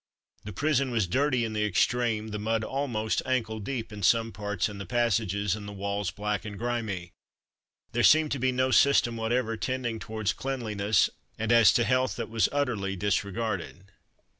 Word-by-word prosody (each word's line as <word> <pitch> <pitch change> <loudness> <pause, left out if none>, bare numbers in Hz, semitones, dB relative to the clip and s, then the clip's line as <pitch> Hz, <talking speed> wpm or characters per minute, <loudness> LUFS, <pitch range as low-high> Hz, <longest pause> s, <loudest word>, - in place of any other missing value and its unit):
The 105 - -5
prison 140 +4 +1
was 115 -5 +1
dirty 125 +5 +1
in 110 - -4
the 105 0 0
extreme; 110 +1 +1
the 105 -1 -4
mud 110 +1 0
almost 120 -5 -1
ankle 115 -4 -1
deep 115 0 -5
in 105 - -7
some 115 +4 +3
parts 105 -2 -2
in 105 -2 -8
the 100 - -5
passages, 105 -4 +1
and 105 -1 -8
the - - -6
walls 100 -1 -2
black 105 0 -3
and 105 -2 -7
grimy. 110 -7 -3 0.8
There 120 - 0
seemed 155 +3 +5
to 140 - -1
be 130 +1 +2
no 130 +1 +1
system 125 -3 +4
whatever 115 0 -1
tending 120 +1 -2
towards 110 -1 -2
cleanliness, 110 -7 0 0.3
and 115 +1 -1
as 115 -4 +7
to 120 - +3
health 130 +1 +1
that - - -5
was 115 -1 +2
utterly 120 -9 -1
disregarded. 100 -1 -2
110 Hz, 175 wpm, -28 LUFS, 105-125 Hz, 0.8 s, as